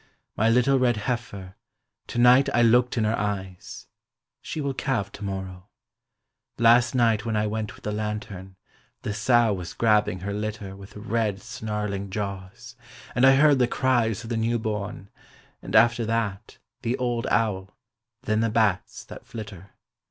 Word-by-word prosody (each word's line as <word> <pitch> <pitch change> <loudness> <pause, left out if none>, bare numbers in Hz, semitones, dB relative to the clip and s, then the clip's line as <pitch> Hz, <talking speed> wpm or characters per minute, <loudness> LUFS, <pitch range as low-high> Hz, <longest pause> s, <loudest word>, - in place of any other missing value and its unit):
My 110 +2 +2
little 125 +3 +3
red 120 -3 +2
heifer, 100 -4 -4 0.5
to - - -6
night 125 +3 +6
I 120 - +4
looked 120 +2 +3
in 110 - +2
her 110 +1 +1
eyes, 95 -3 -5 0.6
She - - -6
will 140 -2 -2
calve 115 -7 -2
to 100 - -10
morrow: 95 -1 -6 0.9
Last 120 +2 +4
night 115 -2 +2
when 115 -2 -2
I 105 0 +1
went 110 0 -3
with - - -19
the 105 - -3
lantern, 105 -3 -5 0.5
the 105 - -3
sow 115 0 +3
was 90 -3 -6
grabbing 105 -5 +2
her 100 +1 -4
litter 105 -2 -5
With 100 0 -13
red, 110 -2 -1
snarling 105 -3 -4
jaws: 100 +4 -6 0.4
and 125 +2 +4
I 135 - +7
heard 145 -1 +5
the 125 - +3
cries 120 -4 +1
Of 115 - -8
the 115 - 0
new 115 +1 +1
born, 105 -1 -5 0.5
and - - -5
after 120 0 +5
that, 110 -3 -2 0.2
the 120 +1 -1
old 120 -2 -1
owl, 105 -3 -1 0.5
then 110 -3 0
the 115 0 +1
bats 110 -4 0
that - - -12
flitter. 105 -4 -9
110 Hz, 160 wpm, -25 LUFS, 100-120 Hz, 0.9 s, I